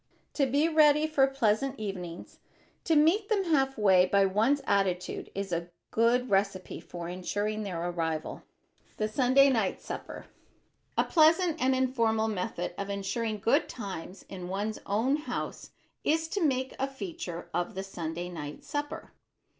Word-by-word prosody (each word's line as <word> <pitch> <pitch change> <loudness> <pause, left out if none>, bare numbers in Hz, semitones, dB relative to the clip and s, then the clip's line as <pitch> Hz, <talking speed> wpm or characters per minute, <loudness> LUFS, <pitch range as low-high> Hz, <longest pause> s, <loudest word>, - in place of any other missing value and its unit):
To 275 -2 +2
be 285 +5 +2
ready 305 -2 +5
for 290 -4 +3
pleasant 270 0 +1
evenings, 180 -5 -6 0.5
to 325 - +3
meet 335 +8 +4
them 415 -3 +2
half 270 -6 +1
way 190 -4 +5
by 200 +1 +4
one's 225 +9 +2
attitude 190 -3 0
is 195 -1 -3
a 170 +1 -2 0.2
good 240 +2 +2
recipe 195 -1 0
for 170 -1 -7
insuring 205 +4 -2
their 175 -4 -3
arrival. 160 -3 -3 0.4
[Sidenote: - - -32
THE 215 - 0
SUNDAY 260 +4 +4
NIGHT 220 -7 0
SUPPER] - - -7 0.7
A - - +5
pleasant 330 0 +4
and 260 +1 +3
informal 230 -4 +1
method 215 +2 -3
of 200 0 -3
insuring 210 +3 -2
good 270 +9 +2
times 195 -4 -7
in 180 -2 -7
one's 205 +3 -2
own 230 +8 +2
house 305 - -5 0.3
is 320 +1 +1
to 390 +1 -1
make 260 -3 0
a 270 - +1
feature 270 - -6
of 175 +1 -2
the 190 - -3
Sunday 175 -2 -5
night 150 -4 -7
supper. 290 -1 -5
220 Hz, 155 wpm, -29 LUFS, 190-275 Hz, 0.7 s, ready